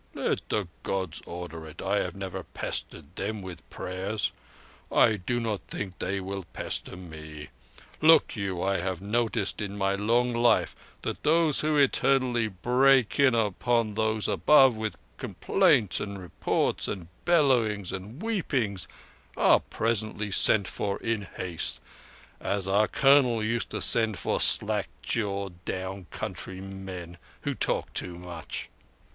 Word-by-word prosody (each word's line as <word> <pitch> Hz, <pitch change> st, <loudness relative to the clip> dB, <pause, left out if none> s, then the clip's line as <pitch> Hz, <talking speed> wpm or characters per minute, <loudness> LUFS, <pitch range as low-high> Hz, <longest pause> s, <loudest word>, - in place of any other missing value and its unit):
"Let -, -, -2 dB
the 105 Hz, -4 st, 0 dB
Gods 95 Hz, -4 st, -3 dB
order 85 Hz, -2 st, -7 dB
it. 75 Hz, -, -12 dB
I -, -, 0 dB
have -, -, -3 dB
never -, -, -5 dB
pestered 75 Hz, +6 st, -5 dB
Them 105 Hz, +1 st, -3 dB
with 95 Hz, -2 st, -9 dB
prayers. 95 Hz, +3 st, -2 dB, 0.6 s
I 110 Hz, -3 st, +4 dB
do 120 Hz, +6 st, -2 dB
not 110 Hz, -4 st, -2 dB
think 95 Hz, -3 st, -6 dB
They 100 Hz, +2 st, -1 dB
will 95 Hz, +1 st, -5 dB
pester -, -, -2 dB
me. 80 Hz, -4 st, -9 dB, 0.5 s
Look 160 Hz, +1 st, +6 dB
you, 95 Hz, -4 st, -2 dB
I 95 Hz, 0 st, +1 dB
have 90 Hz, 0 st, -2 dB
noticed 110 Hz, +1 st, -1 dB
in 100 Hz, -1 st, -4 dB
my 95 Hz, -1 st, +1 dB
long 120 Hz, +5 st, +1 dB
life 120 Hz, +1 st, +3 dB, 0.3 s
that -, -, -4 dB
those 160 Hz, -1 st, +3 dB
who 155 Hz, 0 st, +1 dB
eternally 130 Hz, -4 st, +3 dB
break 125 Hz, +6 st, +3 dB
in 135 Hz, -4 st, +5 dB
upon 115 Hz, +1 st, +1 dB
Those 110 Hz, 0 st, 0 dB
Above 135 Hz, -5 st, +5 dB
with 110 Hz, 0 st, -4 dB, 0.2 s
complaints 105 Hz, -5 st, +2 dB
and 100 Hz, -1 st, -5 dB
reports 90 Hz, -3 st, -1 dB
and 90 Hz, -4 st, -5 dB, 0.2 s
bellowings 120 Hz, -, +2 dB
and 105 Hz, -, -7 dB
weepings 130 Hz, -, -1 dB, 0.5 s
are -, -, +6 dB
presently 110 Hz, -2 st, -2 dB
sent 100 Hz, 0 st, +4 dB
for 100 Hz, -1 st, -2 dB
in 110 Hz, -4 st, -1 dB
haste, 90 Hz, -3 st, -2 dB, 0.6 s
as 100 Hz, -2 st, -2 dB
our 100 Hz, +2 st, +3 dB
Colonel 135 Hz, -5 st, +4 dB
used 115 Hz, +2 st, -1 dB
to -, -, -1 dB
send 110 Hz, -3 st, +3 dB
for -, -, -1 dB
slack -, -, +3 dB, 0.2 s
jawed 100 Hz, -5 st, -2 dB
down 95 Hz, 0 st, -4 dB
country 95 Hz, 0 st, -5 dB
men 95 Hz, -3 st, -8 dB, 0.2 s
who -, -, -2 dB
talked -, -, -1 dB
too 90 Hz, -, -3 dB
much. 90 Hz, -2 st, -6 dB
105 Hz, 140 wpm, -28 LUFS, 95-120 Hz, 0.6 s, Look